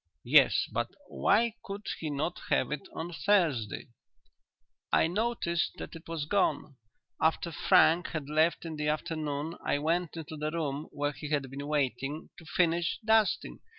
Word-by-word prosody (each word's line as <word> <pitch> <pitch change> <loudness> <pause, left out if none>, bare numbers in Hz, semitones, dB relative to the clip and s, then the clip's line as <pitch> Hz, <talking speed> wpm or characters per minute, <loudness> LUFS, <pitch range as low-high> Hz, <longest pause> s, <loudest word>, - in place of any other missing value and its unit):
"Yes, - - +5
but - - 0 0.2
why 230 +2 +2
could 200 +1 -7
he 160 - -3
not 150 +4 -2
have - - +2
it 150 -2 -4
on 170 +2 -4
Thursday?" 150 - +1 1.0
"I - - +4
noticed 180 -2 0
that - - -7
it 165 - -11
was 165 -3 -3
gone. 155 -6 0 0.4
After 165 +1 +1
Frank 165 +3 +4
had 155 -4 -4
left 155 +3 +2
in 160 -2 -5
the 150 0 -1
afternoon 155 0 -2
I - - +1
went 165 +3 -1
into 160 -1 -7
the 150 +1 -2
room 155 -2 -3
where 145 0 -1
he 150 +1 -7
had 140 -3 -1
been 140 +1 -6
waiting, 145 +1 -1
to 165 - -14
finish 170 0 +1
dusting. 220 -1 +2
160 Hz, 155 wpm, -30 LUFS, 145-170 Hz, 1.0 s, Yes